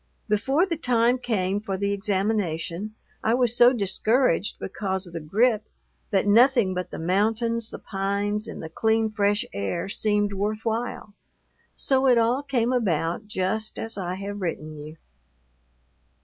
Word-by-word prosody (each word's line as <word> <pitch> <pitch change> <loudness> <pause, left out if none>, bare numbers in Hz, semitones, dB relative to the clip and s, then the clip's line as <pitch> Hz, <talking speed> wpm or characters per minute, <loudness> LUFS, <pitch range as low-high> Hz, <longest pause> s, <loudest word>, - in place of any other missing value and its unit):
Before 270 - +2
the 340 -4 -3
time 245 -3 +2
came 200 -5 -1
for 200 -2 -4
the 200 +1 -1
examination 200 -1 -1 0.3
I 225 +2 +3
was 245 -2 +2
so 240 +1 +7
discouraged 215 -2 +1
because 190 -1 -3
of 175 - -11
the 165 - -3
grippe 215 +8 +1 0.4
that 195 -3 +1
nothing 230 -1 +5
but 180 -1 -4
the - - -7
mountains, 220 +6 0
the - - -7
pines, 200 +2 -2
and 225 - -7
the 160 - -6
clean, 220 +5 +1
fresh 205 0 +1
air 100 - -3
seemed 205 0 +1
worth 210 +3 -2
while; 225 -2 -3 0.6
so 265 0 +2
it 250 -2 +5
all 235 +4 +2
came 255 -4 0
about 185 -4 0
just 215 +2 -2
as 225 0 -3
I 185 -2 -3
have 200 +1 -6
written 155 -3 -4
you. 150 +2 -10
210 Hz, 150 wpm, -25 LUFS, 190-230 Hz, 0.6 s, so